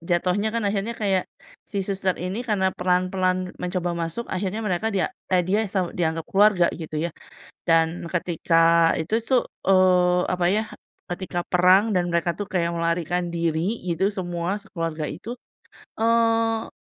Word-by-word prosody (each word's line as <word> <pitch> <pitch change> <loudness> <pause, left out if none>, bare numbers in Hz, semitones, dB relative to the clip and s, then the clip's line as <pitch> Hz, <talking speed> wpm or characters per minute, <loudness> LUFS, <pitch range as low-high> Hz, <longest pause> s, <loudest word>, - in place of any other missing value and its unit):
jatohnya 180 +5 0
kan 230 -1 -2
akhirnya 205 +3 -1
kayak 195 -3 0 0.4
si 200 -2 -2
suster 190 -1 -1
ini 185 +5 -4
karena 205 -6 0
pelan-pelan 185 0 0
mencoba 180 -1 -2
masuk 170 +7 -3
akhirnya 200 +4 -2
mereka 190 +2 0
dia 200 +1 -1 0.2
eee, 180 -2 +2
dia 200 +4 +1
sa 185 -2 -1
dianggap 160 -2 -1
keluarga, 195 -3 +4
gitu 160 -2 -6
ya. - - -11 0.6
Dan 165 +1 +2
ketika 165 -1 +3
itu 165 +7 -1
su 235 +3 0 0.3
eee, 180 -2 +4
apa 180 -1 0
ya, 210 +4 +2 0.5
ketika 175 -1 -3
perang 185 +5 +4
dan 180 -3 +1
mereka 170 0 +1
tuh 205 - -3
kayak 170 -4 0
melarikan 170 +1 -1
diri, 170 +5 -1
gitu, 180 +2 0
semua, 180 -2 -2
sekeluarga 165 -7 -4
itu, 225 +10 -7 0.6
eee, 225 0 +2
180 Hz, 145 wpm, -24 LUFS, 170-200 Hz, 0.6 s, keluarga